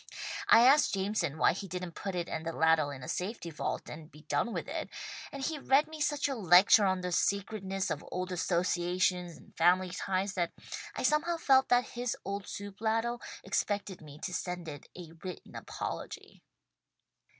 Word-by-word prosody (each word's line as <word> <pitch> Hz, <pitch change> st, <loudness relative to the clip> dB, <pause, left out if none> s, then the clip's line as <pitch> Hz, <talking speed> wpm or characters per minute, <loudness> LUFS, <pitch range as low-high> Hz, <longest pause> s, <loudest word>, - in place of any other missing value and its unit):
I 230 Hz, -, +9 dB
asked 280 Hz, -3 st, +5 dB
Jameson 195 Hz, -6 st, -1 dB
why -, -, +4 dB
he 195 Hz, +2 st, -6 dB
didn't 180 Hz, -1 st, -5 dB
put 195 Hz, +1 st, -5 dB
it 175 Hz, -1 st, -2 dB
and 160 Hz, -, -4 dB
the 165 Hz, -, -3 dB
ladle 160 Hz, -2 st, +3 dB
in 135 Hz, -3 st, -8 dB
a -, -, -7 dB
safety 180 Hz, -2 st, -3 dB
vault 150 Hz, -, -3 dB
and 155 Hz, 0 st, -9 dB
be 150 Hz, +1 st, -15 dB
done 235 Hz, -, 0 dB
with -, -, -4 dB
it, -, -, -4 dB, 0.4 s
and 275 Hz, -1 st, -6 dB
he 310 Hz, 0 st, -2 dB
read 275 Hz, +2 st, +3 dB
me 315 Hz, -1 st, -8 dB
such 295 Hz, -1 st, +1 dB
a 275 Hz, -, -2 dB
lecture 200 Hz, -1 st, +6 dB
on 185 Hz, -1 st, +1 dB
the 180 Hz, 0 st, -3 dB
sacredness 195 Hz, 0 st, -1 dB
of 150 Hz, -, -3 dB
old 185 Hz, 0 st, -3 dB
associations 180 Hz, 0 st, 0 dB
and -, -, -19 dB
family 180 Hz, +2 st, +3 dB
ties 195 Hz, +2 st, -1 dB
that 175 Hz, -3 st, -1 dB, 0.4 s
I -, -, -3 dB
somehow 330 Hz, +3 st, +2 dB
felt 265 Hz, -4 st, +4 dB
that 245 Hz, 0 st, +3 dB
his 245 Hz, 0 st, -3 dB
old 200 Hz, +1 st, -4 dB
soup 200 Hz, 0 st, -7 dB
ladle 225 Hz, +2 st, 0 dB, 0.2 s
expected 200 Hz, -3 st, -2 dB
me 150 Hz, -2 st, -11 dB
to 180 Hz, -, -3 dB
send 180 Hz, -1 st, -4 dB
it 145 Hz, -2 st, -8 dB
a 170 Hz, -3 st, -9 dB
written 185 Hz, -1 st, -8 dB
apology." -, -, -6 dB
185 Hz, 185 wpm, -31 LUFS, 175-225 Hz, 0.4 s, I